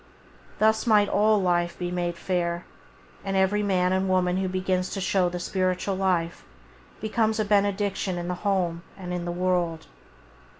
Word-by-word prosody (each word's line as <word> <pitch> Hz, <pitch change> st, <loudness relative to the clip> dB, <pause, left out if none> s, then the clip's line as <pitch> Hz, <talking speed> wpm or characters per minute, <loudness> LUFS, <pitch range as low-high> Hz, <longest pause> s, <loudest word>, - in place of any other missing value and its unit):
Thus 220 Hz, +2 st, +2 dB
might 210 Hz, -2 st, +5 dB
all 215 Hz, +1 st, +3 dB
life 175 Hz, -2 st, 0 dB
be 175 Hz, -1 st, -3 dB
made 175 Hz, -1 st, -2 dB
fair; 175 Hz, -1 st, -2 dB, 0.6 s
and 195 Hz, -1 st, -1 dB
every 190 Hz, +2 st, +2 dB
man 185 Hz, -2 st, +1 dB
and 190 Hz, 0 st, 0 dB
woman 180 Hz, -1 st, +2 dB
who 190 Hz, 0 st, 0 dB
begins 185 Hz, 0 st, -1 dB
to -, -, -3 dB
show 185 Hz, -1 st, +1 dB
the 180 Hz, 0 st, -5 dB
spiritual 185 Hz, +1 st, -1 dB
life 180 Hz, -3 st, -1 dB, 0.6 s
becomes 220 Hz, +1 st, 0 dB
a 215 Hz, -, +1 dB
benediction 200 Hz, -2 st, +1 dB
in 175 Hz, 0 st, -4 dB
the 180 Hz, -, -1 dB
home 180 Hz, -5 st, 0 dB, 0.2 s
and 180 Hz, -2 st, -6 dB
in 175 Hz, -1 st, -3 dB
the 175 Hz, -, -2 dB
world. 175 Hz, -2 st, -1 dB
185 Hz, 165 wpm, -26 LUFS, 180-200 Hz, 0.6 s, might